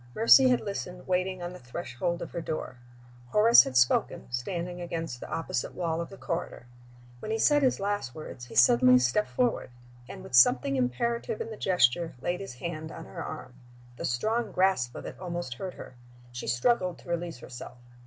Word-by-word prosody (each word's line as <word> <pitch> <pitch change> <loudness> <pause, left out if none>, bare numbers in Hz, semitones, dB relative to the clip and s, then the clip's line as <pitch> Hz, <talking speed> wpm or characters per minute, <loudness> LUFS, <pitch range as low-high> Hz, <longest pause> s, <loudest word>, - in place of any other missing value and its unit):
Mercy 255 +4 +7
had 250 - +2
listened, 180 -3 -6
waiting 185 0 -1
on 175 +1 -5
the - - -10
threshold 150 +6 -4
of - - -9
her 170 - -4
door; 155 -5 -5 0.5
Horace 215 - +7
had 130 - -1
spoken, 125 -1 +2
standing 175 +8 -4
against 165 -7 -4
the - - -9
opposite 165 -6 -3
wall 170 -2 -1
of 170 - -6
the 195 - -11
corridor. 170 -9 -4 0.5
When 215 - -7
he 220 - 0
said 290 +5 +4
his 260 -2 +2
last 200 -11 -2
words 140 -5 -8
he 120 - -12
suddenly 125 +2 +6
stepped 125 +12 +1
forward, 245 - 0 0.4
and - - -9
(with - - -12
something 125 +2 +5
imperative 135 - -1
in 225 - -5
the - - -6
gesture) 175 -5 +2
laid 175 +7 -2
his 195 -11 -7
hand 160 +2 -6
on 165 - -9
her 165 -3 -7
arm. 130 -5 -8 0.4
The - - -4
strong 220 - -1
grasp 185 -10 +1
of - - -7
it - - -8
almost 175 -7 -4
hurt 185 +9 -7
her. - - -10 0.4
She 120 0 -7
struggled 180 - +1
to - - -15
release 170 -2 -3
herself. 125 0 -10
170 Hz, 190 wpm, -28 LUFS, 125-190 Hz, 0.5 s, Mercy